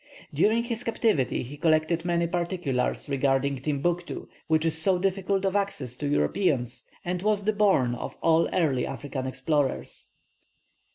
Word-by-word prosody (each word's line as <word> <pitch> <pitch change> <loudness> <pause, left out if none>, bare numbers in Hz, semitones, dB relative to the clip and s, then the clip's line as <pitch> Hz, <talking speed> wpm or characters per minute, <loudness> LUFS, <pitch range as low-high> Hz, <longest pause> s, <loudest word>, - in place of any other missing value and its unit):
During 215 +10 +3
his 235 0 -3
captivity 215 - +1
he 135 +4 -9
collected 160 +1 +2
many 170 -1 +1
particulars 170 -8 -1
regarding 140 0 +1
Timbuctoo, 170 +5 -2 0.2
which 160 0 +2
is 160 -1 +1
so 180 +3 +2
difficult 195 +1 0
of 195 0 0
access 195 - -1
to 145 - -3
Europeans, 130 - 0 0.2
and 180 0 -2
was 210 0 +1
the 215 +2 +1
bourne 195 -13 +3
of 120 - -6
all 165 0 +4
early 145 -8 +1
African 135 -1 -4
explorers. 130 - -1
160 Hz, 145 wpm, -27 LUFS, 135-190 Hz, 0.2 s, all